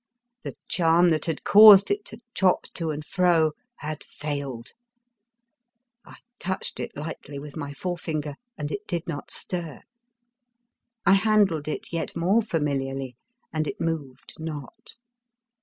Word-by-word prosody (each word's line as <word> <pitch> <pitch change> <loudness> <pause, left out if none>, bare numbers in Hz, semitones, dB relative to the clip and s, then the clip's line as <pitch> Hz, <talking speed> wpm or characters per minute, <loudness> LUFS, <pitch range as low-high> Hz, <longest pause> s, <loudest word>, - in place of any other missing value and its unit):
The - - -7
charm 170 0 +4
that 155 -2 0
had 165 -3 -3
caused 205 - +9
it 405 0 -1
to 220 - -10
chop 185 -2 +3
to 165 -2 -2
and 150 0 -4
fro 170 -3 +3 0.2
had 155 0 -6
failed. 140 -5 -5 1.3
I - - -14 0.2
touched 190 +1 -3
it - - -5
lightly 145 -1 -6
with 145 0 -9
my 145 -3 -5
forefinger, 160 -3 -3 0.2
and 150 0 -4
it 205 +1 -5
did 175 -3 -2
not 145 -4 -5
stir; 170 -5 -4 1.2
I 195 - +6
handled 195 -7 +3
it 155 - -5
yet 165 - -3
more 190 +7 +3
familiarly 135 - -2 0.4
and 155 -1 -1
it - - -5
moved 145 -6 -4
not. 160 - -7
160 Hz, 135 wpm, -25 LUFS, 145-185 Hz, 1.3 s, caused